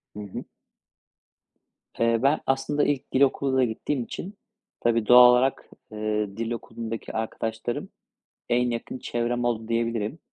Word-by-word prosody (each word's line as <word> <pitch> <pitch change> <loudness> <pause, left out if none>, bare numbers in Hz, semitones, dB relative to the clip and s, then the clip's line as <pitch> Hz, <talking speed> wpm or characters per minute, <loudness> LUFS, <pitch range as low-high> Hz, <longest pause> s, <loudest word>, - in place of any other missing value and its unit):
Hı - - -7
hı. 100 - -7 1.6
Eee, 115 0 +3
ben 140 +3 +4
aslında 135 +2 +1
ilk 145 -3 -1
dil 130 - +2
okuluna 135 -1 +3
gittiğim 125 +3 -2
için 195 - -8 0.4
tabii 115 -2 +1
doğal 125 0 +9
olarak, 130 +2 +1 0.2
eee, 105 -1 -2
dil 115 0 -3
okulundaki 115 -1 -6
arkadaşlarım 110 +1 -3 0.6
en 125 0 +2
yakın 120 +2 -4
çevrem 120 0 -2
oldu, 115 -2 -1
diyebilirim. 115 +3 -1
120 Hz, 130 wpm, -25 LUFS, 115-130 Hz, 1.6 s, doğal